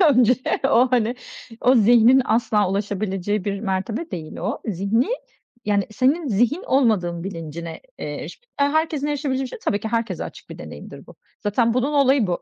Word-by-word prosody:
Önce 250 -2 +5 0.3
o, 255 -1 +4
hani, 240 -2 +2 0.5
o, 255 - +4
zihnin 240 +3 +6
asla 215 -4 +2
ulaşabileceği 200 0 -2
bir 200 -1 -2
mertebe 215 - -3
değil 155 -3 -6
o. 200 +6 -3
Zihni, 205 +3 +1 0.6
yani, 205 -1 +1
senin 275 +9 +1
zihin 245 - +1
olmadığın 190 -10 +1
bilincine, 165 -3 -6 0.2
eee, - - -5
eriş - - -8 0.2
eee, 280 - +5
herkesin 310 -1 0
erişebileceği 280 -2 -1
bir - - -5
şey - - -8
tabii 205 -1 -1
ki, 220 - -4
herkese 230 0 -2
açık - - -11
bir - - -9
deneyimdir - - -10
bu. - - -15 0.2
Zaten, 230 +2 +1
bunun 255 +4 +1
olayı 275 -4 +4
bu. 175 -1 -2
225 Hz, 170 wpm, -22 LUFS, 200-260 Hz, 0.6 s, zihnin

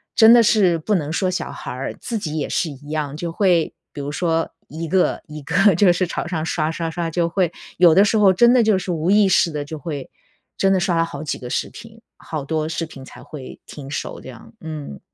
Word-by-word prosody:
真 225 0 +8
的 235 -1 +7
是 195 -6 +3
不 210 +7 -2
能 155 -5 0
说 185 +2 0
小 185 - -3
孩 - - -7
儿， 130 +2 -4
自 230 -2 -4
己 155 -5 -4
也 145 - -1
是 165 - 0
一 145 +1 -11
样， 150 -2 -3
就 170 0 -4
会 175 -3 +2 0.2
比 145 - -6
如 140 +1 -4
说 165 0 -1 0.2
一 165 +2 -6
个 185 +2 +1
一 150 0 -8
个 195 +7 +3
就 180 +1 +5
是 185 +1 0
朝 175 - -4
上 160 -3 -3
刷 155 -2 -1
刷 165 0 -3
刷， 170 0 -3
就 170 +1 0
会 175 -1 0 0.3
有 170 -2 +6
的 195 - +7
时 220 - +2
候 195 -3 +5
真 240 +6 +5
的 250 - +5
就 215 -3 +3
是 185 -1 -3
无 165 +2 -1
意 205 0 +5
识 175 - +3
地 150 -2 -4
就 155 0 -7
会 145 -2 -6 0.5
真 195 0 +2
的 190 - +2
刷 175 -2 0
了 165 - +2
好 150 -2 -7
几 150 - -3
个 125 - -8
视 - - -2
频， 225 0 -13 0.2
好 155 -3 -6
多 155 +1 -1
视 165 0 -2
频 135 -4 -12
才 - - -13
会 140 -4 -10
停 140 -2 -10
手 145 - -5
这 - - -10
样， 120 - -13
嗯。 150 - -7
165 Hz, 265 characters per minute, -21 LUFS, 155-190 Hz, 0.5 s, 真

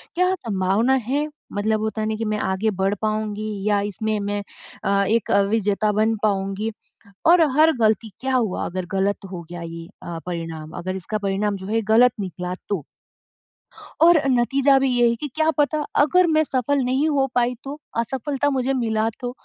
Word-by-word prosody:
क्या 365 +1 +2
संभावना 215 - +1
है 290 +4 0 0.3
मतलब 215 +1 0
होता 220 0 -2
है 215 - -1
ना 220 - -1
कि 225 - -3
मैं 215 0 -1
आगे 190 +3 0
बढ़ 195 +2 +1
पाऊँगी 215 0 -2 0.2
या 205 -1 +3
इसमें 215 +2 -2
मैं 205 0 -2 0.4
अ, 200 0 +3
एक 225 +3 +1 0.2
विजेता 210 -1 +1
बन 220 +2 +2
पाऊँगी। 200 +1 0 0.6
और 340 +1 +7 0.2
हर 320 +1 +6
गलती 220 0 +2
क्या 265 0 -1
हुआ 225 -7 0
अगर 185 0 -4
गलत 195 +1 0
हो 175 -2 -5
गया 175 -1 -6
ये 165 0 -7 0.2
अ, 170 -1 -5
परिणाम। 165 -3 -5
अगर 185 +2 -4
इसका 210 +4 -3
परिणाम 200 0 -1
जो 190 - -8
है 225 +3 +1
गलत 245 +1 +6
निकला 180 -1 -4
तो 190 -9 -2 1.2
और 340 0 +7
नतीजा 270 +2 +3
भी 265 0 +1
ये 240 -1 +3
है 235 - 0
कि 295 +5 -5
क्या 315 0 +2
पता 300 +1 +2 0.2
अगर 360 +4 +4
मैं 310 -1 +3
सफल 275 0 0
नहीं 265 +5 +1
हो 275 -2 +2
पाई 245 0 +2
तो, 280 +2 -7 0.2
असफलता 265 +4 -1
मुझे 265 -1 0
मिला 225 -3 0
तो? 245 -1 -4
220 Hz, 180 wpm, -22 LUFS, 200-265 Hz, 1.2 s, और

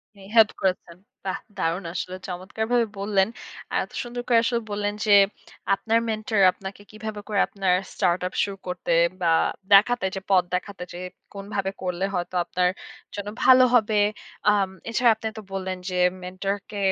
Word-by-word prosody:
উনি 195 - -15
হেল্প 220 -2 +7
করেছেন। 180 -2 -1 0.3
বাহ 185 - -2 0.2
দারুণ 175 +1 -1
আসলে! 185 0 -4
চমৎকারভাবে 220 +6 -1
বললেন। 200 -1 +2 0.4
আর - - +1
এত - - -12
সুন্দর 240 0 -5
করে 235 -2 +5
আসলে 235 -1 0
বললেন 205 0 -1
যে 210 - +2 0.6
আপনার 225 +3 +1
মেন্টর 215 -1 -1
আপনাকে 195 +2 -9
কিভাবে 215 0 -6
করে 205 -2 0
আপনার 190 -2 0 0.2
স্টার্ট 175 0 +1
আপ - - -9
শুরু 200 -1 -4
করতে 180 0 -3 0.3
বা 170 - +2 0.4
দেখাতে 215 +1 +5
যে 190 - -4
পথ 185 -2 +5
দেখাতে 185 0 -4
যে 175 - -7 0.3
কোনভাবে 195 -1 -3
করলে 180 +1 -1
হয়তো 175 +1 -3
আপনার 180 0 +1 0.5
জন্য 205 0 -4
ভালো 255 0 +8
হবে। 215 -2 +3 0.5
আম 200 -2 +2 0.2
এছাড়া 235 +1 +3
আপনি 220 0 -5
তো - - -5
বললেন 190 -1 -3
যে 180 - -4 0.3
মেন্টর 185 +2 -2
কে 205 - -7
200 Hz, 165 wpm, -25 LUFS, 185-215 Hz, 0.6 s, ভালো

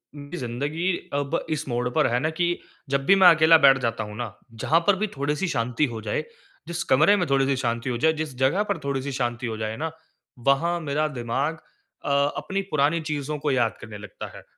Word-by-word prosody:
उनकी 145 +4 -8
ज़िंदगी 145 +9 -2 0.2
अब 145 +3 0
इस 155 -3 -2
मोड़ 120 0 -1
पर 125 - +2
है 120 +1 +1
ना 155 - 0
कि 175 +2 0 0.3
जब 135 0 0
भी 195 - +6
मैं 190 -2 +7
अकेला 160 +1 +7
बैठ 135 -3 +6
जाता 115 -2 -1
हूँ 105 0 -8
ना, 115 -3 -6 0.2
जहाँ 155 +8 +2
पर 205 - +6
भी 210 +3 -1
थोड़ी-सी 150 +7 -1
शांति 125 0 0
हो 110 - -5
जाए 110 - -2 0.4
जिस 170 0 -3
कमरे 155 +10 +5
में 180 -3 0
थोड़ी-सी 135 0 +2
शांति 120 -1 -2
हो 120 - -1
जाए, 160 +6 +3
जिस 155 -4 -5
जगह 135 +10 +2
पर 200 -2 -2
थोड़ी-सी 140 0 -2
शांति 120 -2 -2
हो 110 -1 -4
जाए 110 0 -3
ना, 160 +2 -3 0.5
वहाँ 155 +8 +2
मेरा 150 +1 0
दिमाग 135 +7 -1 0.5
अ - - -2 0.3
अपनी 195 +1 -2
पुरानी 150 +3 +2
चीज़ों 150 -1 -3
को 145 0 0
याद 120 -4 +1
करने 110 -1 -8
लगता 105 - -8
है। - - -12
140 Hz, 210 wpm, -25 LUFS, 120-160 Hz, 0.5 s, मैं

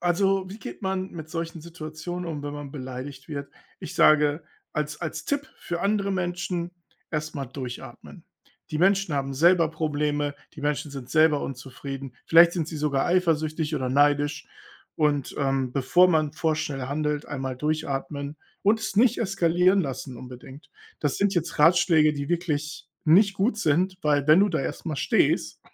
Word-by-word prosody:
also, 190 +2 +1
wie 205 - -8
geht - - -9
man 190 0 -2
mit 160 -2 -9
solchen 165 0 -4
Situationen 165 +2 -6
um, 150 -2 -5
wenn 145 - -4
man 145 -2 -7
beleidigt 130 +1 -7
wird? 140 -2 -5 0.3
Ich - - -7
sage 150 +1 +4 0.3
als 150 0 -3
als 170 - -4
Tipp 285 +1 -2
für 175 0 -4
andere 200 -1 +1
Menschen: 175 -1 -2 0.4
„Erst 155 0 -3
mal 140 -2 -4
durchatmen. 125 -1 -9 0.5
Die 155 - -2
Menschen 195 -2 +3
haben 135 -1 -1
selber 165 +2 +4
Probleme, 145 -2 -1 0.2
die - - -10
Menschen 145 0 -1
sind 135 -3 -8
selber 155 -1 +4
unzufrieden, 135 0 -7
vielleicht 170 +1 +8
sind 170 -4 -2
sie 160 - -6
sogar 145 -2 0
eifersüchtig 160 -3 +1
oder 130 -3 -2
neidisch, 145 +3 +2 0.5
und, 145 -3 +1
ähm, 135 -3 0
bevor 140 +8 +4
man 155 -4 +2
vorschnell 155 -4 -1
handelt, 150 +1 -1
einmal 135 -2 -4
durchatmen 145 -1 -3 0.3
und 215 +3 +3
es 220 -3 -4
nicht 240 +2 +4
eskalieren 185 -2 +3
lassen 130 -2 -5
unbedingt.“ 130 +4 -11 0.3
Das - - 0
sind 200 -1 +2
jetzt 170 -1 -2
Ratschläge, 160 -1 +5
die 140 -1 -4
wirklich 155 -3 -2 0.2
nicht 195 +5 +5
gut 205 +3 +1
sind, 185 +3 +1
weil, 145 -2 +2
wenn 155 +4 +7
du 205 - +4
da 160 - 0
erst 135 - -5
mal 155 -3 -2
stehst - - +1
155 Hz, 165 wpm, -25 LUFS, 145-175 Hz, 0.5 s, vielleicht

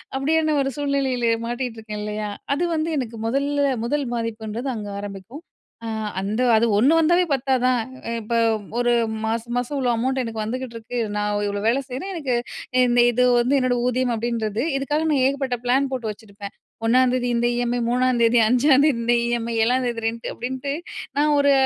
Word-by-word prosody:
அப்பிடியான 310 +3 +1
ஒரு 270 - 0
சூழ்நிலையிலே 270 -4 0
மாட்டிட்டுருக்கேன் 230 -3 -4
இல்லயா! 210 0 -3 0.2
அது 310 - -1
வந்து 315 +1 -1
எனக்கு 240 -4 -3
மொதல்ல, 280 +4 +1 0.2
முதல் 290 +3 -1
பாதிப்புன்றது 230 +2 -4
அங்க 210 -2 -6
ஆரம்பிக்கும். 205 - -8 0.4
அ - - -4 0.3
அந்த 210 +5 -2 0.2
அது 225 - +3
1 270 +8 +5
வந்தாவே 345 +3 +4
பத்தாதா? 255 -1 +1 0.4
அ - - -2
இப்ப 225 +2 -3 0.4
ஒரு 240 0 +2 0.3
மாச 225 +1 0 0.2
மாசம் 250 +4 -2
இவ்ளோ 255 -2 +1
அமௌண்ட் 260 +3 0
எனக்கு 225 -2 -4
வந்துகிட்டிருக்கு. 235 0 -5 0.2
நான் 210 0 0
இவ்ளோ 205 0 -3
வேலை 240 +4 +3
செய்றேன். 270 +11 -5
எனக்கு 275 -7 -1 0.5
இந்த 240 0 +4
இது 250 +1 +2 0.2
வந்து 255 +4 +2
என்னோட 255 -1 +1
ஊதியம் 250 0 +1
அப்பிடீன்றது. 225 -1 -2 0.2
இதுக்காக 295 +3 -1
நான் 275 -3 +2
ஏகப்பட்ட 270 -2 -1
பிளான் 265 +3 +2
போட்டு 240 -4 -3
வச்சுருப்பேன். 200 -2 -10 0.3
"1ஆம் 250 +2 +4
தேதி 250 -1 0
இந்த 235 0 +2
இஎம்ஐ, 245 0 0
3ஆம் 250 0 +2
தேதி, 230 +1 +4
5ஆம் 260 +4 +4
தேதி 300 -4 +3
இந்த 240 +1 +2
இஎம்ஐ 235 -1 -1
7ஆம் 250 +3 +2
தேதி 230 -2 -3
ரென்ட்டு 230 +1 -4
அப்பிடீன்ட்டு 260 +3 -4 0.4
நான் 300 +1 +3
ஒரு 285 0 +4
245 Hz, 170 wpm, -22 LUFS, 230-270 Hz, 0.5 s, 1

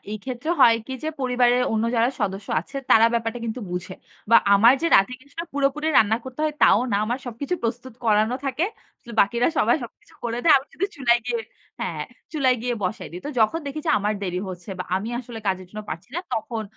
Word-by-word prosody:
এই 215 - -3
ক্ষেত্রে 255 +4 -4
হয় 230 - +8
কি 265 - -6
যে 310 - -2
পরিবারের 250 -1 +3
অন্য 220 +1 +1
যারা 230 +1 +4
সদস্য 200 0 -2
আছে 275 - -11
তারা 225 +1 +7
ব্যাপারটা 230 0 -1
কিন্তু 230 +2 -4
বুঝে। 180 +1 -4 0.4
বা 230 - +9 0.2
আমার 225 +5 +7
যে - - +2
রাতে 195 +6 +3
কিছুটা 290 +4 -8
পুরোপুরি 285 +2 0
রান্না 220 +1 +4
করতে 260 +3 -8
হয় 305 -1 -1
তাও - - +6
না। - - +3
আমার 240 +4 -2
সবকিছু 275 +9 -3
প্রস্তুত 240 +2 -3
করানো 220 +2 +3
থাকে। 270 +5 0 0.6
বাকিরা 235 +6 +3
সবাই 235 +6 +4
সবকিছু 230 - -15
করে 235 0 -2
দেয়। 320 - +7
আমি 270 +2 -2
সুধু 390 - -1
চুলায় 240 -3 +3
গিয়ে 235 -2 -1 0.4
হ্যাঁ। - - -3 0.3
চুলায় 260 -5 +2
গিয়ে 245 -1 -1
বসায় 185 - -3
দি। - - -6
তো - - -4
যখন 220 +10 +3
দেখি 295 +2 -4
যে - - +3
আমার 210 +1 0
দেরি 180 -1 -2
হচ্ছে 180 +1 -8
বা 180 - -3
আমি 205 +4 -3
আসলে 235 -2 -9
কাজের 185 -1 -1
জন্য 215 - -6
পারছি 165 +4 -6
না, - - 0
তখন 220 0 -3
235 Hz, 210 wpm, -23 LUFS, 215-260 Hz, 0.6 s, বা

